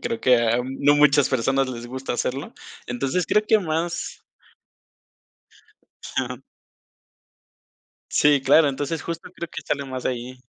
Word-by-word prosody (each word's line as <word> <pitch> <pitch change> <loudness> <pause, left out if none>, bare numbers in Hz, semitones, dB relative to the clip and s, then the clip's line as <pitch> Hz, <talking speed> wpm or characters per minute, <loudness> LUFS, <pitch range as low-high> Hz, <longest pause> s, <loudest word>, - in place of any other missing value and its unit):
creo 230 -1 -2
que 125 -1 +5
a 115 0 +2
no 140 +2 +2
muchas 145 -1 +5
personas 135 +2 +1
les 120 -2 -6
gusta 130 +2 -5
hacerlo, 135 +3 -3 0.3
entonces 135 +8 -1
creo 210 - +3
que 220 - +5
más 170 -1 -3 1.8
Claro. 125 0 -4 1.7
Sí, 145 -2 +4
claro, 145 +3 +5
entonces 145 +3 -3
justo 170 +1 -6
creo 170 - -6
que - - -7
sale 140 -1 -2
más 130 -1 -6
de - - 0
ahí. 125 +1 -7
135 Hz, 135 wpm, -23 LUFS, 130-155 Hz, 1.8 s, que